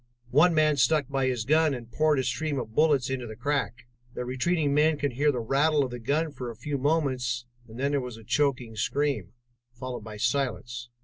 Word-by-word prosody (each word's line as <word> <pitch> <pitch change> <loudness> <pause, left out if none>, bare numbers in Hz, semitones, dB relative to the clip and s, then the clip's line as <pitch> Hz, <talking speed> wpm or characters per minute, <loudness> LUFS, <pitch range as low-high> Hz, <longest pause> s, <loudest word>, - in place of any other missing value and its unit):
One 160 +5 +5
man 155 -1 +3
stuck 140 +1 +2
by 135 -1 0
his 125 -4 -1
gun 155 0 +3
and 120 -1 -10
poured 155 +3 +2
a 130 - +1
stream 155 +1 -2
of 110 -4 -5
bullets 145 -3 +3
into 125 -2 -3
the 110 - -8
crack. 125 -1 -2 0.3
The 125 - -3
retreating 145 +4 0
men 150 +1 +3
could 145 -1 -1
hear 145 +4 +2
the 125 -3 -3
rattle 145 +5 +2
of 130 - -4
the 120 - -6
gun 150 +7 0
for 130 -3 -6
a 115 - -7
few 140 +4 -4
moments 130 -5 0 0.2
and 115 +2 -11
then 140 +2 +1
there 140 -1 +1
was 125 -3 -7
a 115 - -13
choking 125 -2 0
scream, 120 -4 -1 0.5
followed 130 -2 -5
by 105 -1 -8
silence. 120 -1 -2
135 Hz, 210 wpm, -27 LUFS, 120-150 Hz, 0.5 s, One